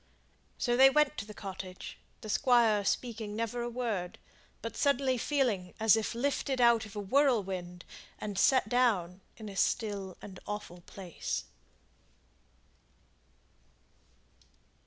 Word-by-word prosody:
So 240 -1 +1
they 265 +2 +8
went 300 +1 +3
to 200 - -4
the 210 - -10
cottage, 190 -2 -8 0.2
the 215 - -8
Squire 230 -5 +4
speaking 220 -1 -2
never 230 +2 -2
a 240 - -2
word, 225 -7 -3 0.5
but 230 - -5
suddenly 275 -2 +2
feeling 235 -9 -1
as 220 -1 +6
if 220 +1 -2
lifted 270 +1 -1
out 235 -2 +4
of 210 - -14
a - - -3
whirlwind 195 -7 0 0.3
and 205 -1 -5
set 260 -1 +4
down 205 -7 +1 0.2
in 220 - -8
a 200 - -8
still 200 -2 -1
and 190 -2 -10
awful 205 -4 -6
place. 185 -4 -5
220 Hz, 125 wpm, -31 LUFS, 195-245 Hz, 0.5 s, they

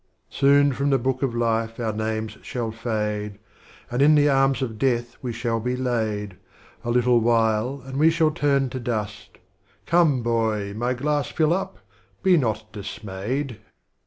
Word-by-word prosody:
XXIX. - - -15
Soon 140 0 +5
from 140 +3 0
the 135 - +4
Book 130 +1 -1
of 130 -4 -1
Life 115 -1 0
our 110 -2 -1
Names 110 0 -3
shall 120 -3 -4
fade, 105 -2 -3 0.5
And 120 +2 0
in 150 +2 +6
the 145 0 +4
Arms 135 0 +2
of 110 -4 -5
Death 120 -2 0
we 125 - -3
shall 115 0 -2
be 125 +3 -2
laid, 110 -6 -2 0.5
A 120 - -4
little 120 0 +3
while 115 +3 +1
and 135 0 -6
we 155 +3 +5
shall 160 -1 +2
turn 140 -4 +1
to 130 - -4
Dust, 110 -3 -4 0.3
— - - -37
Come 160 -8 +3
boy! 110 -3 0
my 120 +4 -1
glass 145 +2 0
fill 160 0 +2
up; 190 +2 -3 0.5
be 190 -2 +5
not 110 - 0
dismayed. 105 +4 -5
120 Hz, 170 wpm, -24 LUFS, 110-135 Hz, 0.5 s, in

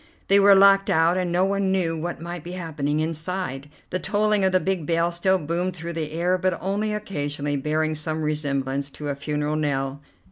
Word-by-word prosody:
They 200 +1 +6
were 200 0 +7
locked 195 0 +6
out, 165 +2 +3
and 180 -2 -1
no 180 +2 +3
one 195 -1 0
knew 175 -4 +1
what 170 +2 -4
might 170 0 -6
be 175 - -7
happening 155 -4 -2
inside. 155 -3 -3 0.2
The 185 - -1
tolling 210 +2 +1
of 190 - +3
the 185 - +4
big 185 -5 -2
bell 170 +1 +1
still 190 +2 +2
boomed 175 +3 -2
through 170 0 -6
the 155 -2 -4
air, 175 +3 0
but 185 0 0
only 205 +3 -1
occasionally, 145 -9 -3
bearing 155 +3 0
some 155 +1 -2
resemblance 140 -2 -1
to 145 +1 -6
a 140 - -1
funeral 150 +1 -2
knell. 140 -2 -2
165 Hz, 200 wpm, -24 LUFS, 150-185 Hz, 0.2 s, were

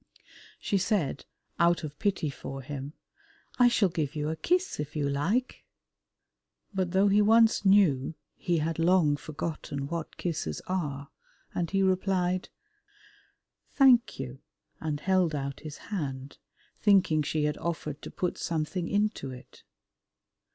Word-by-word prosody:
She 200 - 0
said, 175 - 0 0.3
out 170 0 +3
of 150 -1 -7
pity 190 -8 0
for 135 0 -7
him, 140 +2 -6 0.7
"I 245 - +7
shall 220 -5 +3
give 155 -4 -2
you 150 0 -1
a 160 - -2
kiss 360 - 0
if 150 0 -5
you 145 -2 0
like," 185 - -1 1.1
but 190 -2 0
though 190 +3 +3
he 205 +1 +4
once 225 0 +4
knew 165 -8 +4 0.2
he 175 -3 0
had 160 +1 -1
long 165 -3 +4
forgotten 150 -1 -5
what 165 +1 -5
kisses 150 - -3
are, 150 -6 -3 0.4
and 170 -2 -1
he 195 0 +1
replied, 185 -1 +1 1.2
"Thank 260 -4 +5
you," 135 0 -6 0.4
and 155 -2 -2
held 185 -3 +2
out 140 -1 -4
his 155 -1 -8 0.2
hand, 135 -6 -4 0.4
thinking 190 -7 +4
she 150 +1 -1
had 150 -1 -1
offered 155 -3 -4
to - - -7
put 180 - -3
something 170 +2 -2
into 205 -9 0
it. 125 -1 -12
165 Hz, 135 wpm, -28 LUFS, 145-190 Hz, 1.2 s, I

